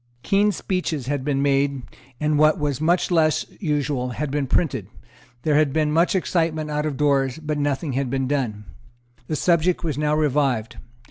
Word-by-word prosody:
Keen 205 Hz, +1 st, +3 dB
speeches 180 Hz, -, -2 dB
had 140 Hz, 0 st, -2 dB
been 140 Hz, -1 st, 0 dB
made, 140 Hz, -1 st, +1 dB, 0.4 s
and, 150 Hz, -1 st, +1 dB
what 155 Hz, 0 st, +5 dB
was 145 Hz, -3 st, -2 dB
much 175 Hz, +3 st, +2 dB
less 160 Hz, -3 st, +2 dB
usual, 145 Hz, -7 st, -1 dB
had 150 Hz, -2 st, -2 dB
been 145 Hz, -1 st, -1 dB
printed; 125 Hz, -, 0 dB, 0.6 s
there 155 Hz, -, +1 dB
had 150 Hz, -1 st, +3 dB
been 155 Hz, 0 st, +1 dB
much 165 Hz, +5 st, +2 dB
excitement 160 Hz, -4 st, 0 dB
out 150 Hz, +1 st, -1 dB
of 145 Hz, -3 st, -4 dB
doors; 140 Hz, -3 st, +1 dB
but 155 Hz, -1 st, -3 dB
nothing 145 Hz, 0 st, -1 dB
had 135 Hz, 0 st, -1 dB
been 135 Hz, 0 st, -1 dB
done. 120 Hz, -7 st, -2 dB, 0.6 s
The 155 Hz, -, -2 dB
subject 175 Hz, +2 st, +2 dB
was 150 Hz, -4 st, -2 dB
now 150 Hz, 0 st, +1 dB
revived. 135 Hz, -6 st, 0 dB
150 Hz, 175 wpm, -23 LUFS, 135-155 Hz, 0.6 s, what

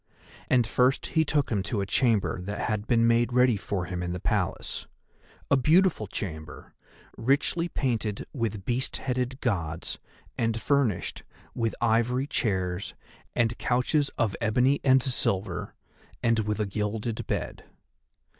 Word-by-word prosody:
And 125 Hz, -2 st, +4 dB
first 125 Hz, +4 st, +2 dB
he 160 Hz, -, +4 dB
took 145 Hz, -3 st, 0 dB
him 105 Hz, -3 st, +1 dB
to 100 Hz, +2 st, -2 dB
a 100 Hz, -, 0 dB
chamber 105 Hz, -3 st, +1 dB
that 100 Hz, +3 st, -4 dB
had 110 Hz, -1 st, -2 dB
been 115 Hz, -2 st, +4 dB
made 115 Hz, +1 st, +3 dB
ready 125 Hz, -1 st, +4 dB
for 95 Hz, -2 st, -3 dB
him 90 Hz, 0 st, -4 dB
in 90 Hz, 0 st, -2 dB
the 90 Hz, -, -4 dB
Palace, -, -, -2 dB, 0.6 s
a -, -, +7 dB
beautiful 155 Hz, -, +3 dB
chamber, 80 Hz, -6 st, -6 dB, 0.4 s
richly 140 Hz, +7 st, +1 dB
painted 115 Hz, -8 st, -1 dB
with 110 Hz, -6 st, -3 dB
beast 125 Hz, +2 st, 0 dB
headed 130 Hz, 0 st, -2 dB
Gods 85 Hz, -8 st, -2 dB, 0.4 s
and 115 Hz, 0 st, +1 dB
furnished 135 Hz, -8 st, 0 dB, 0.3 s
with 115 Hz, -2 st, -1 dB
ivory 120 Hz, +3 st, +2 dB
chairs, 95 Hz, -8 st, -1 dB, 0.4 s
and 115 Hz, 0 st, +2 dB
couches 135 Hz, +4 st, +1 dB
of 110 Hz, -4 st, +1 dB
ebony 125 Hz, +5 st, +3 dB
and 130 Hz, -1 st, +5 dB
silver, 100 Hz, -7 st, -1 dB, 0.5 s
and 115 Hz, -1 st, +3 dB
with 105 Hz, 0 st, -1 dB
a 105 Hz, -, +1 dB
gilded 105 Hz, +2 st, -3 dB
bed. -, -, -3 dB
115 Hz, 140 wpm, -27 LUFS, 100-130 Hz, 0.6 s, a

